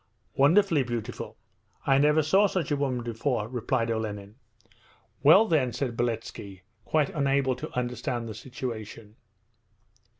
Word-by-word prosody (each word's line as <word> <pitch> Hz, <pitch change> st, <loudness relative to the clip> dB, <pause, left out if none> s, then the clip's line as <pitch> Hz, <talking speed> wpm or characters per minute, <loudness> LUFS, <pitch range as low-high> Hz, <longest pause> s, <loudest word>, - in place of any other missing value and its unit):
'Wonderfully 165 Hz, +2 st, +4 dB
beautiful! 120 Hz, -3 st, -5 dB, 0.5 s
I 135 Hz, 0 st, +4 dB
never 150 Hz, +2 st, +4 dB
saw 195 Hz, +7 st, +4 dB
such 180 Hz, -6 st, -2 dB
a -, -, +3 dB
woman 130 Hz, -4 st, -1 dB
before,' 115 Hz, -1 st, -2 dB
replied 120 Hz, -1 st, -1 dB
Olenin. 105 Hz, -2 st, -4 dB, 0.9 s
'Well 175 Hz, +10 st, +7 dB
then?' 145 Hz, -, +1 dB
said 125 Hz, -1 st, -3 dB
Beletski, 115 Hz, -5 st, -4 dB, 0.2 s
quite 155 Hz, -2 st, +1 dB
unable 140 Hz, -2 st, +1 dB
to -, -, -6 dB
understand 120 Hz, -1 st, -2 dB
the 110 Hz, -, -6 dB
situation. 115 Hz, -4 st, -7 dB
125 Hz, 125 wpm, -27 LUFS, 115-145 Hz, 0.9 s, Well